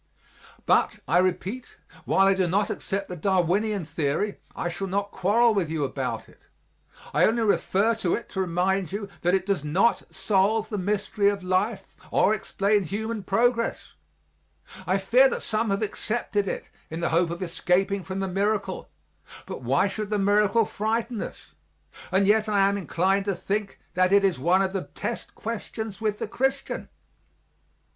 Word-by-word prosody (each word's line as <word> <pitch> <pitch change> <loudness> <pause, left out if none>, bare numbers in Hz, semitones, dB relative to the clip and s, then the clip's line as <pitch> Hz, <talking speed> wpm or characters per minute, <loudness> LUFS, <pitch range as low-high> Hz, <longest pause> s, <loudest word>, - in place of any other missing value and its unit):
But, - - +2
I 165 +6 +4
repeat, 185 +6 -2 0.3
while 195 - +4
I 195 - +5
do 190 -2 +1
not 200 +4 +1
accept 195 0 -3
the 180 - -6
Darwinian 190 +2 +1
theory 160 +6 -1 0.2
I - - -2
shall 175 +3 -4
not 200 +2 -2
quarrel 220 +5 +3
with 190 -6 0
you 160 -2 -1
about 135 - -3
it; - - -21 0.7
I - - +3
only 230 +1 +1
refer 210 +1 +2
to 185 -6 +1
it 235 - -6
to 190 - -2
remind 185 0 0
you 200 +1 -4
that 175 +2 +3
it 190 -1 -1
does 195 -7 0
not 180 +10 +2
solve 205 +3 +1
the 210 - -3
mystery 200 +1 +1
of 200 -2 -3
life 190 +2 -1
or 210 - +3
explain 205 0 +1
human 215 +5 -3
progress. 230 +4 0 0.9
I - - +3
fear - - +5
that 480 0 -4
some 220 0 0
have 195 +2 0
accepted 210 -1 -2
it - - -5 0.2
in 160 +2 -5
the 170 - +1
hope 170 +1 +2
of 170 +2 -4
escaping 185 +3 0
from 190 +3 -4
the 195 - -1
miracle, 200 +3 -1 0.6
but - - -7
why 135 +11 +2
should 210 +1 -4
the 210 - 0
miracle 205 +2 +3
frighten 220 +2 -2
us? - - -8 0.6
And 190 +1 +3
yet 215 +1 +3
I 200 -2 +4
am 200 - +1
inclined 195 +1 0
to 200 -2 0
think 200 +3 -3
that 185 +1 +2
it 200 0 +5
is 190 -8 +2
one 180 +7 +3
of 190 0 -2
the 195 - -2
test - - -5
questions 220 -1 -5
with 215 -1 0
the - - -4
Christian. 270 +4 -2
195 Hz, 170 wpm, -26 LUFS, 185-215 Hz, 0.9 s, I